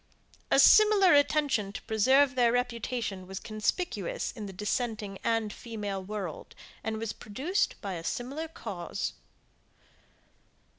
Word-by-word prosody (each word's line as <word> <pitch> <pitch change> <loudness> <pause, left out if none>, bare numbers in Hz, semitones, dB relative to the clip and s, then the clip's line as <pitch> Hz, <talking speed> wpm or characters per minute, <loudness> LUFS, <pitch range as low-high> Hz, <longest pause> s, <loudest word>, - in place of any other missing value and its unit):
A - - +4
similar 420 -4 +7
attention 285 -8 +2
to - - -6
preserve 265 +6 +4
their 245 -2 +3
reputation 235 -5 -2
was 190 0 -6
conspicuous 355 - -2
in 215 -4 -7
the - - -7
dissenting 210 0 -3
and 225 -2 0
female 205 -4 -5
world, 195 -5 -6 0.3
and 220 0 -2
was 220 -1 -3
produced 285 - -2
by 200 -3 -4
a 165 -2 -6
similar 275 - -3
cause. 200 - -5
225 Hz, 120 wpm, -29 LUFS, 205-270 Hz, 0.3 s, similar